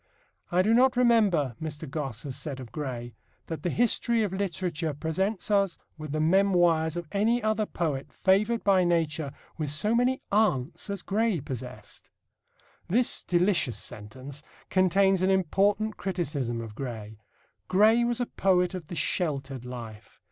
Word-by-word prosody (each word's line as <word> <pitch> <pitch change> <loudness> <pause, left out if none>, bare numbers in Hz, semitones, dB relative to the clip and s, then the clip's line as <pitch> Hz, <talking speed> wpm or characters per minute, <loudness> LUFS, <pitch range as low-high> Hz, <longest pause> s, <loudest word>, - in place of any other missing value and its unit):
"I 180 +1 +3
do 215 +3 +3
not 255 +1 +4
remember," 205 - +3
Mr. 155 0 -5
Gosse 135 -6 -4
has 135 -3 -5
said 140 -4 -5
of 125 -4 -9
Gray, 120 -4 -5 0.3
"that 160 - -5
the 180 - -1
history 235 +1 +2
of 200 -3 -2
literature 175 -5 -2
presents 190 +7 -2
us 200 -3 +2 0.2
with 155 -2 -7
the 155 - -1
memoirs 175 -2 +3
of 175 - -4
any 220 +4 +1
other 215 -1 +1
poet 150 -6 -3
favoured 210 +5 +2
by 190 -2 +4
nature 160 -4 0 0.3
with 150 -2 -1
so 180 +10 +1
many 250 +2 +2
aunts 200 - +1
as 200 -2 -3
Gray 215 -2 +1
possessed." 130 -2 -8 0.8
This 230 +7 +2
delicious 175 - +1
sentence 130 +6 -6 0.3
contains 190 0 +3
an 185 - +2
important 200 +3 +1
criticism 140 -11 -2
of 110 -2 -8
Gray. 110 -4 -7 0.5
Gray 215 +5 +5
was 240 0 0
a 245 - +1
poet 185 -4 +1
of 180 -5 -6
the 175 - -6
sheltered 135 -8 -2
life. 115 -4 -9
175 Hz, 150 wpm, -27 LUFS, 140-200 Hz, 0.8 s, Gray